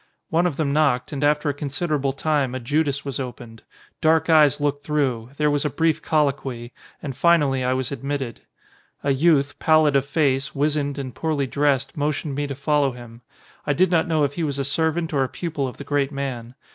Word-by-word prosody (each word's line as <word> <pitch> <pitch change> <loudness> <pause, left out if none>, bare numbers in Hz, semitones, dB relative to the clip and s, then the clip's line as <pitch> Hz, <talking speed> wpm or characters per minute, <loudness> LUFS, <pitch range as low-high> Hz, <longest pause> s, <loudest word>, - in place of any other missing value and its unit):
One 170 +2 +3
of 155 - -4
them 145 -3 0
knocked, 140 -4 +1
and 145 0 -3
after 150 +1 +2
a 145 - +1
considerable 145 0 -2
time 140 -2 0
a - - -2
judas 140 +2 -1
was 140 -2 -4
opened; 120 -3 -7 0.4
dark 160 +1 +3
eyes 150 -2 +5
looked 145 0 -1
through; 130 -7 -1
there 150 -1 +2
was 145 -1 0
a 150 - 0
brief 160 +2 +1
colloquy; 135 -5 -1 0.3
and 135 -3 -5
finally 145 -4 +3
I 125 0 +1
was 130 0 -2
admitted. 140 -3 -4 0.6
A 140 - +1
youth, 145 0 +2
pallid 155 -2 +4
of 135 - +4
face, 140 -2 0
wizened, 145 0 0
and 130 -3 -5
poorly 150 +1 -1
dressed, 140 0 0
motioned 145 0 -2
me 145 +1 -2
to 140 - -5
follow 140 -1 +1
him. 120 -1 -12 0.5
I 145 - +3
did 185 +5 +2
not 165 -1 +2
know 160 -3 +2
if 140 0 0
he 170 - -3
was 140 -3 -1
a 140 - -1
servant 160 +3 -1
or 135 -2 +2
a 130 - -2
pupil 155 -6 -3
of 125 - -8
the - - -7
great 145 -1 0
man. 130 -4 -5
145 Hz, 205 wpm, -23 LUFS, 135-150 Hz, 0.6 s, eyes